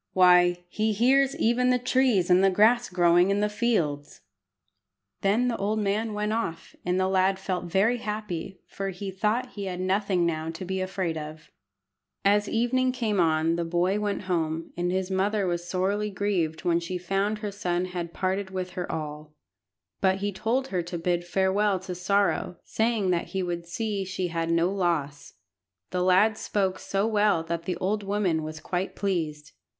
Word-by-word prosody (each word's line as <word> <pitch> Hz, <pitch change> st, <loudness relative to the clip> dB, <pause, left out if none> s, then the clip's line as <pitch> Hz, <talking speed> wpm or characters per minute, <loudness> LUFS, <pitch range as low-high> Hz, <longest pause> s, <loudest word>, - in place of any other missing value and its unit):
Why, 180 Hz, -1 st, +5 dB
he 215 Hz, +4 st, 0 dB
hears 265 Hz, +5 st, +3 dB
even 245 Hz, +2 st, +2 dB
the 250 Hz, -, +4 dB
trees 250 Hz, -7 st, +2 dB
and 180 Hz, +2 st, +5 dB
the 195 Hz, -, +6 dB
grass 225 Hz, +5 st, +4 dB
growing 175 Hz, 0 st, +4 dB
in 200 Hz, +1 st, +1 dB
the 210 Hz, -, +2 dB
fields!" 175 Hz, -11 st, -1 dB, 1.0 s
Then 215 Hz, +6 st, +2 dB
the 235 Hz, -, -1 dB
old 210 Hz, +2 st, -1 dB
man 210 Hz, +1 st, -1 dB
went 210 Hz, +1 st, -1 dB
off, 165 Hz, -8 st, -4 dB
and 180 Hz, +1 st, 0 dB
the 185 Hz, -, +2 dB
lad 190 Hz, 0 st, +2 dB
felt 185 Hz, -2 st, -3 dB
very 195 Hz, +7 st, +2 dB
happy, 210 Hz, -4 st, -5 dB
for 195 Hz, 0 st, -5 dB
he 195 Hz, +1 st, -5 dB
thought 220 Hz, +6 st, -1 dB
he 200 Hz, -2 st, -6 dB
had 180 Hz, -1 st, -4 dB
nothing 185 Hz, -1 st, +1 dB
now 160 Hz, -1 st, -1 dB
to 165 Hz, +3 st, -6 dB
be 190 Hz, +1 st, -2 dB
afraid 185 Hz, -4 st, -2 dB
of. 155 Hz, +1 st, -9 dB, 0.7 s
As 205 Hz, +1 st, +3 dB
evening 255 Hz, +3 st, +1 dB
came 225 Hz, -6 st, -1 dB
on 165 Hz, 0 st, +2 dB
the 170 Hz, -, 0 dB
boy 175 Hz, +4 st, +1 dB
went 205 Hz, -1 st, -2 dB
home, 165 Hz, -3 st, -2 dB
and 175 Hz, 0 st, -1 dB
his 190 Hz, 0 st, -1 dB
mother 200 Hz, +2 st, +1 dB
was 175 Hz, -1 st, -2 dB
sorely 200 Hz, +3 st, 0 dB
grieved 185 Hz, -5 st, -1 dB
when 170 Hz, -2 st, +2 dB
she 170 Hz, +2 st, -4 dB
found 195 Hz, +4 st, -1 dB
her 210 Hz, -1 st, -4 dB
son 180 Hz, -3 st, -1 dB
had 175 Hz, -2 st, -5 dB
parted 190 Hz, +2 st, -2 dB
with 185 Hz, -1 st, -4 dB
her 180 Hz, 0 st, -4 dB
all; 150 Hz, -1 st, -6 dB, 0.7 s
but 190 Hz, -1 st, +3 dB
he 205 Hz, +1 st, -2 dB
told 240 Hz, +7 st, -1 dB
her 180 Hz, -2 st, 0 dB
to 175 Hz, +1 st, -5 dB
bid 175 Hz, +1 st, 0 dB
farewell 190 Hz, +2 st, +1 dB
to 185 Hz, -1 st, -6 dB
sorrow, 180 Hz, 0 st, 0 dB
saying 220 Hz, -4 st, 0 dB
that 170 Hz, -1 st, 0 dB
he 190 Hz, -1 st, -2 dB
would 170 Hz, -1 st, -4 dB
see 205 Hz, +2 st, -2 dB
she 185 Hz, -1 st, -3 dB
had 165 Hz, 0 st, -2 dB
no 170 Hz, +2 st, +2 dB
loss. 165 Hz, -7 st, -2 dB, 0.6 s
The 180 Hz, -, -1 dB
lad 190 Hz, +4 st, +4 dB
spoke 190 Hz, -2 st, -1 dB
so 195 Hz, +1 st, -1 dB
well 210 Hz, -6 st, +2 dB
that 170 Hz, 0 st, -4 dB
the 180 Hz, -, -2 dB
old 205 Hz, +3 st, -1 dB
woman 195 Hz, -5 st, 0 dB
was 155 Hz, 0 st, -6 dB
quite 180 Hz, +3 st, -3 dB
pleased. 155 Hz, -6 st, -2 dB
190 Hz, 180 wpm, -26 LUFS, 175-210 Hz, 1.0 s, the